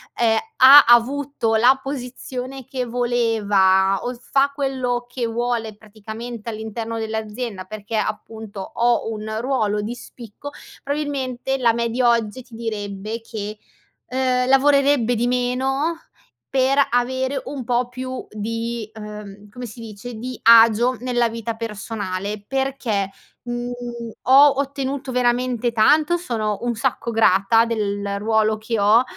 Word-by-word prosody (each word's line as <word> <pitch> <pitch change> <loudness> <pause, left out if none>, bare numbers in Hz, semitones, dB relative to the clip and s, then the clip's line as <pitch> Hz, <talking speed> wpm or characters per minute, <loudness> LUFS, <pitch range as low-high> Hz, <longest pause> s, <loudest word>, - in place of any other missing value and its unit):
ehm, 225 -2 +2 0.2
ha 275 +3 +10
avuto 240 0 +3
la 250 +4 +5
posizione 260 -1 -6
che 255 0 -3
voleva 210 -6 +2
o 245 - -2
fa 275 +3 +1
quello 260 -3 -2
che 245 -1 -3
vuole 230 -1 -2
praticamente 220 +2 -8
all'interno 225 +1 -5
dell'azienda, 220 -2 -4
perché, 215 +2 -5
appunto, 215 -1 -4
ho 235 +2 0
un 215 0 -5
ruolo 215 -5 0
di 220 +3 -4
spicco, 240 +3 -10 0.3
probabilmente 270 -3 -2
la 235 -2 +4
me 235 0 -1
di 240 +3 -1
oggi 235 0 +1
ti 235 -1 -15
direbbe 215 -1 -5
che, 215 -2 -6 0.5
uhm, 255 0 0
lavorerebbe 275 -2 +4
di 235 +1 0
meno 265 +6 0 0.5
per 265 0 +2
avere 260 +3 0
un 275 -2 -5
pò 245 +1 0
più 255 +1 -6
di, 230 +1 -4
uhm, 210 -1 -9
come 245 +4 -9
si 230 +1 -11
dice, 225 +2 -8
di 245 +2 -6
agio 230 +2 +6
nella 245 -1 +1
vita 230 0 -4
personale 205 -2 -5
perché, 260 -7 -1 0.3
mhmm, 240 0 -4 0.5
ho 275 +1 +6
ottenuto 275 -1 -3
veramente 245 -1 +1
tanto, 300 +9 +4
sono 220 - -2
un 240 -1 -1
sacco 235 0 -2
grata 225 0 +4
del 205 -3 -2
ruolo 215 0 +1
che 225 +1 -3
ho, 210 +4 +5
235 Hz, 130 wpm, -21 LUFS, 215-255 Hz, 0.5 s, ha